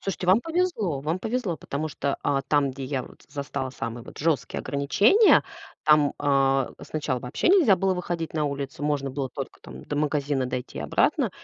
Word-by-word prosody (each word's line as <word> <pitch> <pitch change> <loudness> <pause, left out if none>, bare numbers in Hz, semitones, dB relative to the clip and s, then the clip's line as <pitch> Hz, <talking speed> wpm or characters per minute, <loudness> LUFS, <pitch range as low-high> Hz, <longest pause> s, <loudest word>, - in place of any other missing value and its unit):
Слушайте, 190 -2 -4
вам 190 +5 +5
повезло, 325 - -1
вам 160 +5 -1
повезло, 225 -7 -2
потому 140 +2 -4
что, 140 -1 -2
а, 140 -1 +1
там, 140 0 +2
где 135 +1 -8
я 130 -1 -2
вот - - -16
застала 140 -2 -4
самые 115 -2 -5
вот - - -12
жесткие 145 -7 0
ограничения, 200 - +4 0.4
там, 150 -2 +5
а, 135 -2 +2
сначала 145 -5 -2
вообще 125 - -1
нельзя 320 - +6
было 190 0 +1
выходить 175 -2 -4
на 155 -2 +1
улицу. 140 0 -4
Можно 145 -2 0
было 135 0 -3
только - - -7
там 65 +1 -11
до - - -4
магазина 145 -3 0
дойти 125 0 -5
и - - -3
обратно. - - +1
145 Hz, 185 wpm, -25 LUFS, 135-175 Hz, 0.4 s, нельзя